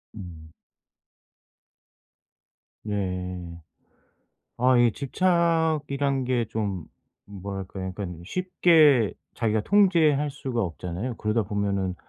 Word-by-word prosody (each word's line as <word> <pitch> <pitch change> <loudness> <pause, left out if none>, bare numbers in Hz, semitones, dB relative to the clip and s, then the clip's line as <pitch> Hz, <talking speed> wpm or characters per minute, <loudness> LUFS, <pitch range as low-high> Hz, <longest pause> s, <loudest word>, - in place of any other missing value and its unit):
음. 80 -6 -10 2.3
네. 90 -4 -4 1.0
아 125 +1 +4
이 120 -1 +5
집착이란 155 -4 +1
게 125 -2 0
좀 100 -6 -3 0.4
뭐랄까요. 95 -1 -6
그러니깐 90 -4 -6
쉽게 155 - +4 0.2
자기가 110 -2 0
통제할 160 - +3
수가 130 -4 -3
없잖아요. 90 +6 -4
그러다 105 +1 0
보면은 100 -2 -2
110 Hz, 190 characters per minute, -25 LUFS, 95-140 Hz, 2.3 s, 이